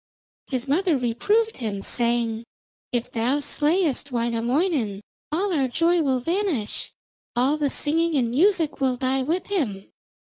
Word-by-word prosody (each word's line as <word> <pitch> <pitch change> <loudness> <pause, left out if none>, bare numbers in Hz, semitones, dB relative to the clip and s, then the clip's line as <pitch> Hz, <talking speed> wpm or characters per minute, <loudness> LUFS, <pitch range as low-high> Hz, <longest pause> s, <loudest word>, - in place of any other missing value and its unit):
His 255 -1 -3
mother 330 +2 +2
reproved 410 - +1
him, 210 -5 -4
saying, 235 -1 0 0.5
'If 240 -1 -2
thou 245 +5 +1
slayest 295 0 0
Wainamoinen 235 - 0 0.3
all 370 +5 0
our 275 -5 +2
joy 335 +6 +2
will 265 -4 +1
vanish, 330 - -1 0.4
all 260 +5 +3
the 295 -2 0
singing 325 +4 +1
and 240 -4 +1
music 325 +1 +2
will 260 -2 +2
die 265 +1 0
with 330 +7 -1
him. 215 - -2
270 Hz, 135 wpm, -24 LUFS, 240-330 Hz, 0.5 s, all